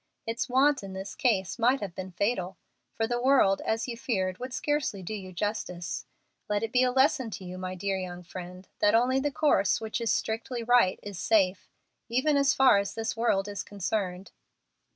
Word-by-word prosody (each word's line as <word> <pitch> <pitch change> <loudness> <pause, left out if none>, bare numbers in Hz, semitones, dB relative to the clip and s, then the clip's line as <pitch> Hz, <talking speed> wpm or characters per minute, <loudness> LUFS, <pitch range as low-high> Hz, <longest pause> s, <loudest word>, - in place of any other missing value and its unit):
Its 235 +4 -2
want 275 +3 +3
in 195 -1 -8
this 190 +1 -6
case 210 -3 0
might 250 +4 +3
have 195 -4 -5
been 185 +1 -6
fatal, 185 -1 -1 0.4
for 225 - 0
the 240 +1 -1
world, 255 -7 +4
as 225 +2 -1
you 240 - -4
feared, 190 -7 -2
would 255 +1 -5
scarcely 265 -8 -1
do 200 - -5
you 190 -3 -6
justice. 180 -2 -3 0.4
Let 210 +1 0
it 225 - -2
be 250 - +3
a 255 -1 +3
lesson 265 -1 +3
to 200 -3 -7
you, 180 +1 -7
my 185 0 -4
dear 195 +1 -2
young 180 -1 -6
friend, 180 +1 -9
that 210 +1 +4
only 250 +3 +3
the 290 +2 0
course 210 -10 +2
which 220 +1 -4
is 230 - +1
strictly 230 +2 -2
right 240 -5 +4
is 205 -3 -7
safe, 190 -1 +2 0.4
even 260 +6 +2
as 280 -1 +3
far 265 -6 +6
as 200 -1 -4
this 225 0 -2
world 210 -4 +1
is 200 -1 -4
concerned." 195 -2 -3
215 Hz, 195 wpm, -28 LUFS, 190-245 Hz, 0.4 s, far